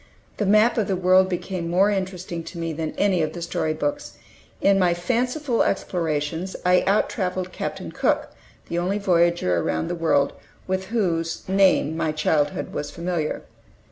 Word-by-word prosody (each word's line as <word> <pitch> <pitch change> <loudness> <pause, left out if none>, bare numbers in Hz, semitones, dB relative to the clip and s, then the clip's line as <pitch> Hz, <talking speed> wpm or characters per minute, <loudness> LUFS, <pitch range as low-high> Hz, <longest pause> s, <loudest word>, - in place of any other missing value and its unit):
The 205 - 0
map 215 +4 +4
of 210 - 0
the 195 - 0
world 185 +1 +4
became 180 -1 -3
more 190 +4 +3
interesting 185 -3 -3
to - - -9
me 165 -1 -3
than 155 0 -4
any 195 -4 +2
of 155 - -1
the 175 - -7
story 160 -2 -1
books. 290 - -3 0.4
In 195 0 +4
my 175 -2 +3
fanciful 245 - 0
explorations 165 0 -1
I 180 0 +5
out 200 +2 +3
traveled 185 -1 -3
Captain - - -5
Cook, - - 0 0.4
the 170 - -2
only 185 +3 0
voyager 170 - +2
around 80 -1 -1
the - - -1
world 165 -4 +2 0.3
with 190 0 -2
whose 170 -6 -1
name 190 -5 +3
my 160 -1 0
childhood 155 -1 0
was 145 - -3
familiar. 170 -3 -3
180 Hz, 165 wpm, -23 LUFS, 165-195 Hz, 0.4 s, I